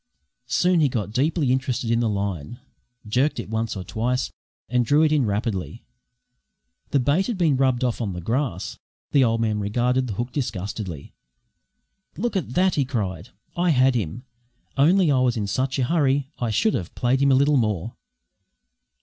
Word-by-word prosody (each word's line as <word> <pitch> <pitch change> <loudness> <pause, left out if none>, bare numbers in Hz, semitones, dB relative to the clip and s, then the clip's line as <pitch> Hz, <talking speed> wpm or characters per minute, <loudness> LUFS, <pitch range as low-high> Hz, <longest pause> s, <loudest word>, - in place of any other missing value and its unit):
Soon 180 +5 +2
he 150 -3 +3
got 105 -4 -3
deeply 140 +3 +1
interested 130 -3 -1
in 115 - +2
the 115 -2 +1
line, 100 - -3 0.5
jerked 135 +7 +1
it - - -6
once 110 -1 -1
or 95 - -5
twice, 125 +5 -1 0.4
and 125 +1 +2
drew 145 +6 +3
it 155 - +3
in 145 -6 +2
rapidly. 105 +1 -3 1.0
The 140 - +2
bait 145 +9 +2
had 235 -5 -2
been 165 -6 +3
rubbed 130 -2 +1
off 125 -1 -1
in 100 -5 -2
the 90 - -5
grass. 115 - -2 0.3
The 140 - +5
old 115 -1 +1
man 110 -2 0
regarded 125 +5 0
the 110 - -3
hook 120 +5 -3
disgustedly. 100 - -4 1.0
"Look 235 +1 -2
at 155 -9 -2
that!" 185 0 +3
he 145 - +2
cried. 100 - -3 0.3
"I 175 +1 +1
had 130 -3 +4
him, 115 0 -3 0.5
only 165 +4 +4
I 135 - +3
was 125 -2 +2
in 105 - -1
such 130 +7 -1
a 130 - +1
hurry. 140 -1 +1
I 120 - -1
should 210 - +2
ha' 90 - -2
played 125 +2 +1
him 140 0 +4
a - - +5
little 140 +2 +4
more." 105 -3 -1
125 Hz, 180 wpm, -23 LUFS, 110-140 Hz, 1.0 s, The